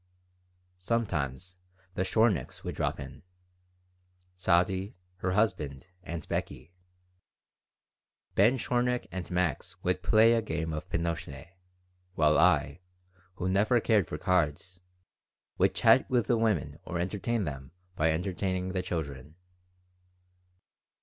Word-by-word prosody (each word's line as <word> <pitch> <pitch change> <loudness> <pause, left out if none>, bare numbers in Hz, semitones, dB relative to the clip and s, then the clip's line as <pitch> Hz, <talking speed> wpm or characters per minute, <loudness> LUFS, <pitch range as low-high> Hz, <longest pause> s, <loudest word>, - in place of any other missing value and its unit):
Sometimes 90 - -2 0.4
the 90 - -2
Shorniks 100 - +1
would - - -4
drop - - -2
in - - -9 1.1
Sadie, 95 +2 +1 0.2
her 95 0 -1
husband, 90 -7 -1
and 85 -2 -6
Beckie. - - -4 1.6
Ben 115 +7 +4
Shornik 125 0 0
and 90 -1 -5
Max 90 -5 -1
would 90 +1 0
play 110 +4 +5
a 115 - +2
game 80 -5 -3
of 75 - -6
pinochle, 85 -4 -3 0.7
while 75 -1 +4
I, 70 +4 +3 0.6
who 95 - -3
never 105 +6 +3
cared 110 -5 +2
for 75 - -5
cards, 90 +1 0 0.8
would - - +3
chat - - +5
with 125 -4 +2
the 120 - +2
women 85 -10 0
or 90 - -4
entertain 105 +5 -1
them 70 -4 -6 0.2
by 80 -2 +2
entertaining 95 +2 -1
the 95 0 -1
children. 75 -5 -5
90 Hz, 115 wpm, -29 LUFS, 80-105 Hz, 1.6 s, play